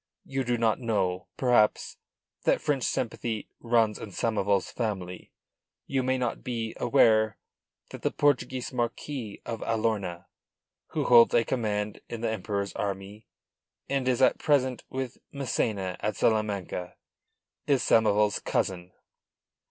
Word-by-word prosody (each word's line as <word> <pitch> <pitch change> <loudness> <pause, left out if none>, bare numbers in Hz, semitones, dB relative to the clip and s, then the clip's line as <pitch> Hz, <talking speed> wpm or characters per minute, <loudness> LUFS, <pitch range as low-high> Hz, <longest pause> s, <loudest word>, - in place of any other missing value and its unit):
You 135 0 -2
do 120 -1 0
not 115 0 +2
know, 100 -6 -1
perhaps, 120 -5 +2 0.5
that - - +3
French 145 -4 0
sympathy 115 -2 -2
runs 115 -2 +2
in 110 - -7
Samoval's 100 -1 0
family. 95 -6 -4 0.5
You 135 -1 0
may 130 +1 +1
not 125 -2 -2
be 115 -3 -3
aware 110 -4 +4 0.5
that - - -8
the - - +1
Portuguese 135 -1 0
Marquis 120 -1 -4
of 115 -2 -4
Alorna, 105 -6 -1 0.6
who - - -2
holds 120 -1 +7
a 115 -1 +4
command 105 -4 -2
in 115 -1 -5
the 115 - 0
Emperor's 100 -1 -3
army, 100 +2 -5 0.6
and 135 -2 -1
is 130 0 +2
at - - +4
present 130 -4 +1
with 130 -1 -4
Massena 110 -8 -1
at 105 -1 -2
Salamanca, 100 -5 -1 0.7
is 140 -3 +3
Samoval's 105 -2 +3
cousin." 90 -1 -2
115 Hz, 130 wpm, -28 LUFS, 100-125 Hz, 0.7 s, holds